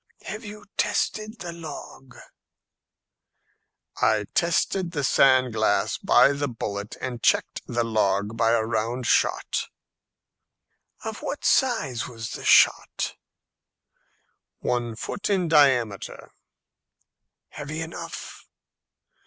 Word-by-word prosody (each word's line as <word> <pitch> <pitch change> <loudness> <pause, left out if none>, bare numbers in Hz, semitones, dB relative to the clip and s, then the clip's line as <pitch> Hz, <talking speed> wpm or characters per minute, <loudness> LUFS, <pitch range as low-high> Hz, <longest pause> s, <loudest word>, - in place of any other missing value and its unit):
"Have 215 +3 -6
you 210 -1 -10
tested 215 +1 -1
the 175 -2 -5
log?" 150 -5 -10 1.9
"I 110 -1 +3
tested 175 +1 +1
the 145 -3 -2
sand 130 -2 +4
glass 110 0 +1
by - - +5
the 145 0 -2
bullet, 105 -4 -5
and 125 -2 -5
checked - - +1
the 120 0 0
log 105 -1 0
by 115 0 +2
a 115 -1 +3
round 115 +2 -2
shot." - - +1 1.4
"Of 220 -1 -5
what 290 - -5
size 190 - +1
was 115 -2 -7
the - - -7
shot?" - - +4 1.4
"One 120 -2 -2
foot 200 - -4
in 190 -4 +1
diameter." 130 - +2 1.2
"Heavy 150 +2 -6
enough?" 165 +1 -8
130 Hz, 105 wpm, -25 LUFS, 115-170 Hz, 1.9 s, by